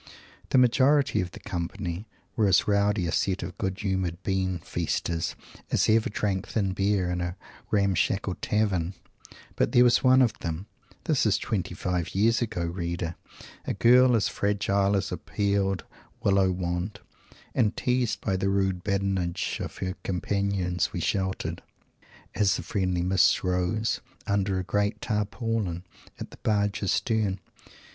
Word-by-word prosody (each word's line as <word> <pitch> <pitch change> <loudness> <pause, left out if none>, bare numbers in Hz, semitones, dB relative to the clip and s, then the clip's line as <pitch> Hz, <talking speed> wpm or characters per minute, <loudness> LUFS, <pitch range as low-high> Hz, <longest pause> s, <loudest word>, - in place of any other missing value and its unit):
The - - +3
majority 130 -1 +4
of 90 - -4
the 85 - -11
company 85 +2 -4 0.3
were 110 -3 +3
as 95 - +4
rowdy 100 -2 +2
a 85 - -1
set 95 -2 0
of 90 +1 -6
good 95 0 -2
humored 95 -4 -1
Bean 95 -2 0
Feasters 85 0 -2 0.3
as - - +2
ever 110 0 +3
drank 100 -2 -1
thin 100 -4 0
beer 95 -1 +1
in 90 0 -2
a 90 0 -3 0.3
ramshackle 100 -1 +1
tavern. 95 -4 0 0.6
But - - +1
there 120 - +7
was 120 -1 +4
one 130 0 +6
of 115 -3 +2
them 85 +3 -4 0.4
this 145 -7 +2
is 105 -1 +3
twenty 95 -5 -3
five 90 -2 -2
years 115 +5 +3
ago, 90 -7 -2
reader! 85 -1 -3 0.5
a - - -2
girl 125 +5 +6
as 110 - +2
fragile 100 0 +1
as 95 -1 -1
a 90 - -2
peeled 100 0 0 0.4
Willow 95 -1 +3
wand 90 +3 -3 0.5
and 110 -4 +1
teased 125 -3 0
by 95 - 0
the 95 +1 0
rude 95 -2 0
badinage 95 -3 -1
of - - -6
our 95 0 -2
companions 95 -1 -1
we - - -4
sheltered 95 +2 -2 0.7
as 105 -2 +2
the - - -4
friendly 90 -3 -1
mists 95 0 +3
rose 90 +4 0 0.2
under 100 -1 0
a 95 - -1
great 105 +3 0
Tarpaulin 105 -4 -2 0.4
at - - -7
the - - -13
barge's 105 -1 0
stern. 110 -4 0
95 Hz, 150 wpm, -27 LUFS, 90-105 Hz, 0.7 s, there